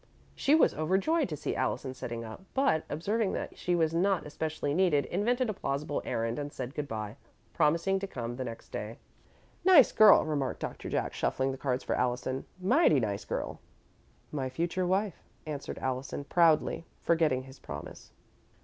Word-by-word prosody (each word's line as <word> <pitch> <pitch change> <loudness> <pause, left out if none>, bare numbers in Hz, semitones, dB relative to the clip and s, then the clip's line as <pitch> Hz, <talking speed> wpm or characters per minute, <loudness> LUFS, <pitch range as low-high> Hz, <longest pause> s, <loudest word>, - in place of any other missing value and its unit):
She 285 - +3
was 320 - +4
overjoyed 195 - +1
to 150 - -4
see - - -3
Allison 130 -2 -1
sitting 120 -2 -5
up, 110 +6 -9
but, 265 - +2
observing 200 +7 0
that - - -4
she 180 - 0
was 165 -2 +2
not 190 +2 +2
especially 150 -1 -3
needed, 165 -4 +3
invented 240 +7 0
a 215 - -1
plausible 145 -4 -2
errand 115 +3 -1
and 145 0 -4
said 130 -1 -6
good 150 -1 -3
bye, 110 -2 -5 0.4
promising 170 +5 +2
to 195 - -4
come 120 -8 -5
the 130 - -3
next 115 -2 -8
day. 110 +2 -5 0.7
"Nice 345 -8 +7
girl," 215 -1 +7
remarked 145 -4 -1
Doctor - - -5
Jack, - - -1
shuffling 130 +1 0
the - - -4
cards 130 -2 -1
for - - -1
Allison. 125 +1 -1
"Mighty 195 - +4
nice 100 -4 -2
girl." - - -4 0.7
"My 135 -3 -2
future 175 +6 -1
wife," 195 +1 0 0.2
answered 150 -2 -5
Allison, 130 +2 -3
proudly, 165 +1 +3
forgetting 160 -6 +2
his 135 +1 -13
promise. - - -9
150 Hz, 165 wpm, -30 LUFS, 130-190 Hz, 0.7 s, Nice